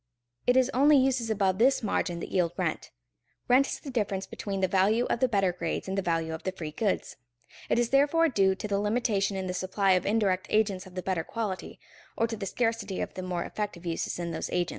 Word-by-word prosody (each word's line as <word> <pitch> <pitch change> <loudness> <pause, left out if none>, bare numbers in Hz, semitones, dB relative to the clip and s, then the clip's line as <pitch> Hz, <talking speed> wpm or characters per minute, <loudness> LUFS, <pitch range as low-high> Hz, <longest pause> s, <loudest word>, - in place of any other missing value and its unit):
It 250 +1 +5
is 260 +1 +3
only 285 +3 +6
uses 260 -3 +2
above 195 -3 +1
this 260 +1 +4
margin 175 -4 -1
that - - -6
yield 175 -3 +1
rent. - - -2 0.6
Rent 260 +3 +5
is - - -4
the 275 - -8
difference 200 -5 -1
between 195 -2 -5
the 190 - +3
value 200 +6 +3
of - - 0
the 255 - +3
better 195 -6 +1
grades 170 0 -3
and 190 - -2
the 195 - +1
value 165 -3 -1
of 160 - -6
the 190 - -2
free 160 -4 -6
goods. 200 +5 -2 0.5
It - - +2
is 240 -1 +1
therefore 290 +4 +4
due 195 -8 +2
to 210 - -5
the 200 -1 0
limitation 210 -2 0
in 190 - -3
the 180 - -3
supply 190 +2 +1
of 185 -1 +2
indirect 200 -3 +1
agents 200 -4 +1
of 185 - -15
the 185 - -4
better 185 -4 -1
quality, 210 -2 -5 0.4
or 230 - +3
to 225 0 -4
the 200 -2 -5
scarcity 225 -3 -1
of - - -3
the 185 - -5
more 180 -2 -2
effective 205 -5 -5
uses 165 -1 -2
in 170 -1 -3
those 165 - -4
agents. 175 -1 0
195 Hz, 230 wpm, -28 LUFS, 185-230 Hz, 0.6 s, only